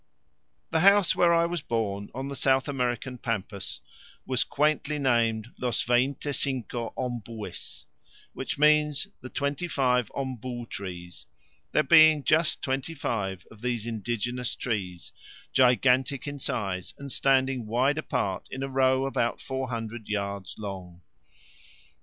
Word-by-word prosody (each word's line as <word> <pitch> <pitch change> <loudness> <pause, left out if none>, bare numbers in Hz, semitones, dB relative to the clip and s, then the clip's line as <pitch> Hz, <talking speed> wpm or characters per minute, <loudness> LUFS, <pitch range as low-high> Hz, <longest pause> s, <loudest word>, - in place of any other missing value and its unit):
The 160 - +2
house 200 0 +5
where 175 -1 +4
I 170 0 +4
was 170 -1 -2
born, 100 -6 -2
on 135 +1 -3
the 140 - -5
South 135 0 +2
American 125 -2 -2
pampas, 105 -4 -3 0.4
was 130 -2 +2
quaintly 150 0 +1
named 115 -5 +1
Los 120 -3 0
Veinte 130 +4 +1
cinco 125 -4 -2
Ombues, 115 -4 -5 0.5
which - - -4
means 150 +1 +4 0.2
"The 130 - -8
Twenty 140 +6 -2
five 125 -6 +1
Ombu 125 -3 -4
Trees," 90 -3 -7 0.4
there 150 - +3
being 155 0 +7
just 155 +2 +2
twenty 135 +3 -2
five 95 - -3
of 110 - -15
these 120 -3 -2
indigenous 120 +2 -2
trees 95 -7 -3 0.4
gigantic 130 +1 +3
in 145 0 -5
size, 95 -8 -2
and 140 -1 -7
standing 130 -3 +2
wide 130 +7 +2
apart 95 -10 -2
in 130 +1 -5
a 135 - -3
row 130 0 +3
about 120 -3 0
400 120 -4 -4
yards 100 -2 -3
long. 95 -4 -7
125 Hz, 130 wpm, -27 LUFS, 110-140 Hz, 0.5 s, being